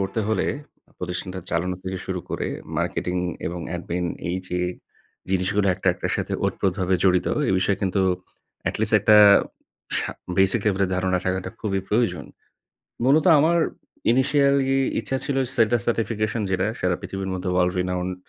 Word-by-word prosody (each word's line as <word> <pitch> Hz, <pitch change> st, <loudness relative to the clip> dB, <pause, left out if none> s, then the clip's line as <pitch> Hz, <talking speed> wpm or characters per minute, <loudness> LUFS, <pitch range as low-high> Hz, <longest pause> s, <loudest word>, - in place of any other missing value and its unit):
করতে 95 Hz, +3 st, -1 dB
হলে, 110 Hz, -, +1 dB, 0.5 s
প্রতিষ্ঠানটা 90 Hz, +1 st, -4 dB
চালানো 90 Hz, +2 st, 0 dB
থেকে 95 Hz, 0 st, -4 dB
শুরু 90 Hz, -1 st, -3 dB
করে -, -, -2 dB, 0.3 s
marketing 90 Hz, 0 st, -1 dB, 0.3 s
এবং 85 Hz, +1 st, -4 dB, 0.2 s
admin, 85 Hz, 0 st, -3 dB, 0.2 s
এই 90 Hz, -, -1 dB
যে 90 Hz, -, -2 dB, 0.7 s
জিনিসগুলো 95 Hz, +2 st, +1 dB
১ 90 Hz, -, -7 dB
টা -, -, +3 dB
১ -, -, -15 dB
টার -, -, -1 dB
সাথে -, -, -3 dB
ওতপ্রোতভাবে 95 Hz, -1 st, 0 dB
জড়িত, 90 Hz, -2 st, +3 dB, 0.2 s
এই -, -, +2 dB
বিষয়ে 95 Hz, +1 st, +1 dB
কিন্তু 95 Hz, 0 st, +1 dB, 0.7 s
atleast 110 Hz, 0 st, 0 dB
১ 105 Hz, -, -11 dB
টা 105 Hz, -, +9 dB, 0.8 s
সা -, -, -2 dB, 0.3 s
basic 95 Hz, +4 st, +4 dB
level 100 Hz, -1 st, +2 dB
এর 95 Hz, -, -3 dB
ধারণা 95 Hz, 0 st, +1 dB
থাকাটা 95 Hz, 0 st, -1 dB
খুবই 95 Hz, -3 st, -1 dB
প্রয়োজন। 115 Hz, +2 st, 0 dB, 0.8 s
মূলত 140 Hz, +6 st, +4 dB
আমার 165 Hz, +4 st, +3 dB, 0.5 s
initially 135 Hz, +1 st, +3 dB, 0.2 s
ইচ্ছা 135 Hz, -, -2 dB
ছিল 140 Hz, -2 st, -1 dB, 0.2 s
SETA 115 Hz, +1 st, +3 dB
certification 110 Hz, -1 st, -1 dB
যেটা, 95 Hz, +2 st, +1 dB
সারা 90 Hz, -1 st, +1 dB
পৃথিবীর 95 Hz, 0 st, -5 dB
মধ্যে 90 Hz, 0 st, -3 dB
world 90 Hz, 0 st, +2 dB
renowned 90 Hz, 0 st, -2 dB
95 Hz, 155 wpm, -23 LUFS, 90-110 Hz, 0.8 s, টা